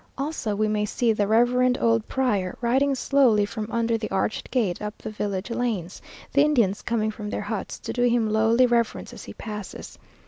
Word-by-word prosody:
Also 275 -7 -2
we 215 +1 +1
may 210 0 0
see 225 +2 +1
the 205 -1 0
reverend 250 +3 +3
old 230 -1 +2
prior 205 -9 -1
riding 265 +4 +2
slowly 255 -6 +3
from 215 0 -5
under 230 0 0
the 215 - -4
arched 195 +3 -2
gate 215 -9 0
up 210 0 -5
the - - -7
village 205 0 -3
lanes, 225 -7 -2 0.3
the 280 - +5
Indians 235 -10 +2
coming 220 -2 -1
from 210 -1 -7
their - - -3
huts 205 -1 -4
to - - -5
do 245 - -2
him 240 -2 +3
lowly 225 +3 +3
reverence 235 -2 0
as - - -10
he - - -9
passes. 210 -3 -8
225 Hz, 195 wpm, -25 LUFS, 210-245 Hz, 0.3 s, the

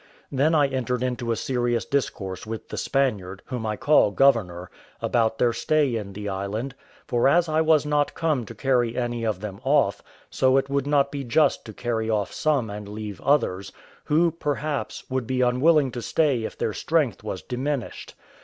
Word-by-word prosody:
Then 145 +4 +2
I 145 -2 +5
entered 130 -2 -2
into 125 -2 -2
a - - +1
serious 120 -4 -1
discourse 105 -7 -3
with 110 0 -6
the - - -6
Spaniard, 100 -9 -1
whom 125 -4 -4
I 105 - -1
call 145 +1 +4
governor, 100 -8 +2 0.3
about 115 -2 +1
their 120 -1 +2
stay 145 -2 +1
in 100 -3 -5
the 105 +1 -6
island; 100 +7 -3 0.3
for 120 0 +2
as 170 +4 +4
I 155 0 +2
was 155 -2 +3
not 150 -1 0
come 155 -6 0
to 115 - -9
carry 120 -1 +1
any 120 -1 -2
of 110 -4 -1
them 100 -2 -7
off, 135 -6 +2 0.3
so 130 0 +3
it 135 0 0
would 140 0 0
not 140 -1 +2
be 140 -1 -4
just 145 +3 +2
to 110 - -9
carry 115 -2 -2
off 105 -3 -1
some 145 -7 +1
and 105 0 -7
leave 105 -2 -7
others, 115 -9 +1 0.3
who, 165 +3 +3
perhaps, 150 -2 -3
would 130 -3 -2
be 130 +1 0
unwilling 135 +3 +3
to 120 - -5
stay 135 -5 +1
if - - -7
their 110 - -1
strength 150 - 0
was 100 -4 -5
diminished. 130 +1 -4
125 Hz, 185 wpm, -24 LUFS, 110-140 Hz, 0.3 s, I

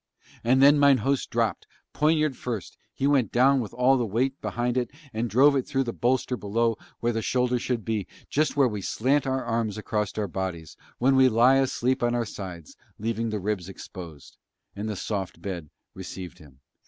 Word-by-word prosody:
And 130 +3 +4
then 145 +1 +7
mine 140 -2 +6
host 140 -1 0
dropped; - - -1 0.3
poniard 155 -2 +2
first, 115 -6 -5 0.2
he 135 - -3
went 135 -7 +3
down 135 +3 +4
with 110 -5 -4
all 125 +1 +3
his 115 - -2
weight 130 +5 0
behind 120 0 -1
it 125 -2 0 0.2
and 115 +2 -2
drove 140 +7 +5
it 135 - 0
through 135 - 0
the 120 -2 -4
bolster 125 +1 0
below 115 +1 0 0.3
where 120 0 +1
the 115 - -1
shoulder 125 +2 +1
should 120 -3 -2
be, 110 -5 -2 0.2
just 150 0 0
where 140 -2 +5
we 105 -4 -4
slant 135 +9 +1
our 130 -1 -1
arms 115 -3 -1
across 105 -1 -2
our 105 -1 -1
bodies, 85 -4 -5 0.2
when 135 +2 +3
we 130 0 +6
lie 120 +4 +5
asleep 130 -1 +1
on 120 0 +1
our 120 -1 0
sides, 90 -7 -8 0.2
leaving 115 +1 -2
the 105 -1 -2
ribs 100 -2 -3
exposed: 85 -6 -10 0.4
and 105 +2 -4
the 105 - -3
soft 95 -1 -4
bed 85 -6 -6 0.2
received 95 -1 -8
him. 70 -3 -17
120 Hz, 190 wpm, -26 LUFS, 105-130 Hz, 0.4 s, then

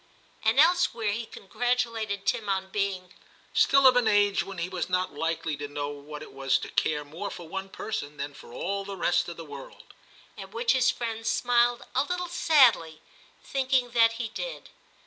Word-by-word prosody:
* - - -32
And 225 +4 +3
elsewhere 310 -10 +3
he 225 +2 -4
congratulated 225 -2 -2
Tim 225 -4 0
on 190 -1 -1
being 195 -2 -2 0.2
* - - -29
still 275 0 +4
of 255 -1 +8
an 245 -2 +3
age 205 -1 +3
when 195 -1 -7
he 170 +1 -2
was 185 -1 -4
not 180 -2 0
likely 165 +1 -2
to 145 0 -5
know 145 0 -4
what 145 +1 -8
it - - -13
was 135 0 +1
to - - -7
care 150 -1 0
more 165 +8 -6
for 175 - -9
one 195 +3 -5
person 150 -9 -5
than 145 0 -5
for 120 - -14
all 195 +10 -3
the 195 0 -7
rest 175 0 +1
of 170 - -8
the 165 - -8
world,* 140 -2 -11 0.5
at 195 +1 -9
which 235 +1 +2
his 255 -1 +3
friend 225 -2 -3
smiled 240 0 +2
a 260 - +3
little 360 +2 -3
sadly, 245 - +4 0.4
thinking 260 -2 0
that 230 -1 +4
he 230 -1 -4
did. - - -7
200 Hz, 195 wpm, -27 LUFS, 165-245 Hz, 0.5 s, of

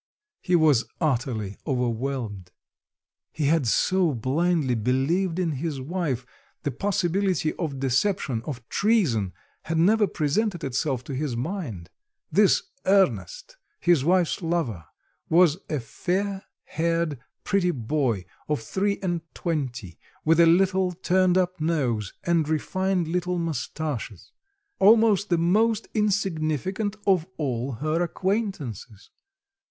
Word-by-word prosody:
He 180 - +1
was 150 -7 +4
utterly 120 - -1
overwhelmed. 120 - -2 0.8
He 155 - -2
had 150 -3 +2
so 175 - +2
blindly 145 +3 +1
believed 135 - 0
in 180 -3 0
his 145 0 -3
wife; 140 -4 -2 0.4
the 145 - -1
possibility 185 +1 0
of 145 -6 -4
deception, 135 - 0
of 125 -5 -6
treason, 165 - +1 0.3
had 165 0 -1
never 205 +5 +4
presented 175 +5 -1
itself 135 -1 -1
to 140 - -7
his 130 -3 -2
mind. 125 - -5 0.4
This 205 -1 +4 0.2
Ernest, - - +1 0.2
his 170 -6 +3
wife's 180 +3 +2
lover, 160 - -2 0.4
was 170 -1 +5
a 150 - -1
fair 190 - -2 0.2
haired 165 -3 -1 0.2
pretty 195 -3 +1
boy 120 - -1 0.2
of 150 - +1
three 195 - -1
and 175 -3 -1
twenty, 125 - -3 0.3
with 165 +1 +4
a 170 - +7
little 185 +1 +3
turned 185 +1 +2
up 180 -2 0
nose 130 - 0
and 165 -3 +1
refined 185 +3 0
little 180 +1 -1
moustaches, 155 - -4 0.5
almost 215 -1 +5
the 175 - +3
most 215 +6 +2
insignificant 195 - 0
of 185 -4 +3
all 130 -3 -2
her 155 +7 -1
acquaintances. 175 - -3
165 Hz, 115 wpm, -25 LUFS, 130-185 Hz, 0.8 s, a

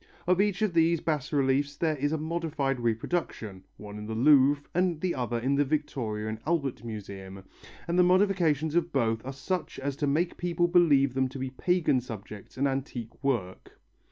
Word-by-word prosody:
Of 180 +2 +3
each 205 0 0
of 210 -5 +1
these 165 0 +3
bas 150 -4 -2
reliefs 140 0 +1
there 160 -2 +1
is 145 +1 -1
a 160 - 0
modified 155 -4 -2
reproduction, 115 - -2
one 105 0 -9
in 105 - -7
the 110 - -4
Louvre 140 +3 +5
and 180 -2 +1
the 180 +1 -1
other 120 -2 -2
in 130 +4 0
the 140 +1 +3
Victoria 130 -8 -2
and 110 0 -4
Albert 145 -8 -1
Museum, 95 -4 -8 0.4
and 175 +1 +1
the - - +7
modifications 180 -5 +2
of 170 0 +1
both 115 -5 0
are 135 - -5
such 155 +6 -4
as 140 0 -3
to 145 - 0
make 165 +5 0
people 175 0 +1
believe 150 -7 +4
them 130 0 +1
to 135 - -8
be 130 0 -4
pagan 160 -2 +1
subjects 105 -3 -9
and 140 +2 +2
antique 135 -3 -5
work. 115 -10 -2
140 Hz, 185 wpm, -28 LUFS, 120-170 Hz, 0.4 s, the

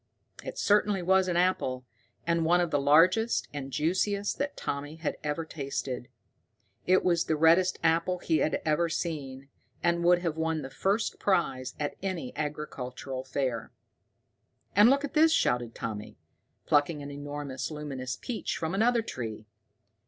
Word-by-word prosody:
It - - -7
certainly 205 -2 +2
was 190 +1 +3
an 175 -1 0
apple, 130 -8 +1 0.4
and 170 0 +1
one 175 +2 +4
of 175 -2 0
the 145 - +2
largest 180 +11 +4
and 135 -2 -5
juiciest 200 +7 0
that 285 +1 -2
Tommy 145 +2 -4
had 160 -1 -3
ever 150 +2 -2
tasted. 135 -5 -4 0.8
It 185 +1 +4
was 170 -2 +2
the 160 - +1
reddest 165 +4 +4
apple 165 +2 +2
he 165 -2 +1
had 155 - 0
ever 160 +2 +2
seen, 140 -5 -4 0.3
and 170 0 +2
would 175 +1 +4
have 165 -2 -1
won 160 -1 -1
the 135 - -7
first 195 +10 0
prize 165 -10 0
at 145 -1 -3
any 185 -9 -4
agricultural 135 -3 -5
fair. 130 -4 -3 1.0
"And 205 +4 +7
look 280 +2 +3
at 285 - -8
this!" 320 +1 +5
shouted 120 - +1
Tommy, 105 -2 -6 0.5
plucking 145 0 +2
an 140 - -7
enormous 145 -2 -5
luminous 135 -5 -5
peach 245 - -3
from 160 +1 -3
another 230 +3 +3
tree. 110 - -6
160 Hz, 150 wpm, -29 LUFS, 140-185 Hz, 1.0 s, And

